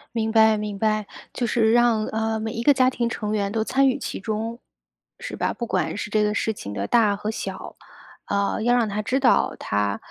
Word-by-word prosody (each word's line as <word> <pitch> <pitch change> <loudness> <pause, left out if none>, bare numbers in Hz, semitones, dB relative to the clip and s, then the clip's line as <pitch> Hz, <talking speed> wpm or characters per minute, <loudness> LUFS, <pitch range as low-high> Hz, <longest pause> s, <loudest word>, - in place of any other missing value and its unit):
明 225 -1 0
白， 220 -1 +5
明 210 -1 -4
白。 215 0 0 0.3
就 240 - -2
是 225 -2 +2
让， 235 -2 +3
呃， 220 0 -1
每 220 0 -3
一 230 - -4
个 290 - +6
家 255 -1 +3
庭 240 -2 -2
成 210 -3 -4
员 200 -2 0
都 220 0 0
参 270 +4 +2
与 255 - +1
其 - - -5
中 225 +3 -4 0.6
是 - - -6
吧？ - - -1
不 240 - -4
管 165 -7 -1
是 205 - -5
这 215 0 +2
个 210 0 +1
事 220 +1 -1
情 100 - -8
的 100 -1 -3
大 210 - +3
和 210 +2 -3
小， - - -7 0.5
呃， 200 +1 0
要 240 +2 +3
让 235 -3 +1
他 205 +1 -2
知 255 +6 0
道 260 - +3
他， 100 0 -1
220 Hz, 235 characters per minute, -23 LUFS, 210-235 Hz, 0.6 s, 个